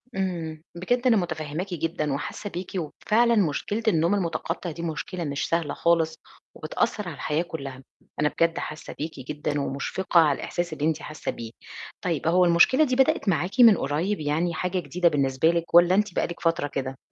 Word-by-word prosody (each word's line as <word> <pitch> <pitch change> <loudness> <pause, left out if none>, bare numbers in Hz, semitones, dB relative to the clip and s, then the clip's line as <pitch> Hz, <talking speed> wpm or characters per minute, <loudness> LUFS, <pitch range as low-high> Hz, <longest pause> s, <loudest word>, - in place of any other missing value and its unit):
امم، 170 -5 -3
بجد 245 +9 0
أنا 225 -3 +5
مُتفهماكِ 165 +1 -3
جدًا 160 -3 -2
وحاسة 175 +8 -5
بيكِ، 180 +1 -6
وفعلاً 220 +8 +1
مشكلة 205 +4 0
النوم 170 -1 +3
المُتقطع 170 -2 -3
دي 165 - -8
مشكلة 170 +2 -4
مش 145 -2 -2
سهلة 165 -3 0
خالص، 170 -1 +2 0.4
وبتأثر 210 -3 -2
على 165 - -5
الحياة 150 +3 -1
كُلّها، 135 -6 -7 0.4
أنا 150 0 +3
بجد 165 +1 +1
حاسة 155 0 -7
بيكِ 155 -1 -5
جدًاً، 145 +2 -3
ومُشفقة 145 +7 0
على 150 -4 +4
الإحساس 175 -1 -3
اللي 150 -1 -2
أنتِ 160 -1 0
حاسة 155 - -5
بيه، 115 -1 -8 0.5
طيب 165 -4 -2
هو 180 +2 +4
المشكلة 175 - +5
دي 255 -3 0
بدأت 265 -5 +2
معاكِ 180 - -1
من 225 -6 +8
قريب؟ 165 +10 -1
يعني 155 +3 0
حاجة 180 +3 -1
جديدة 175 0 +1
بالنسبة 140 +1 +2
لِك؟ 170 0 -1
والّا 175 +2 +7
أنتِ 210 -2 +1
بقالِك 170 - -2
فترة 165 -3 +1
كده؟ 135 -1 -4
170 Hz, 175 wpm, -25 LUFS, 150-185 Hz, 0.5 s, من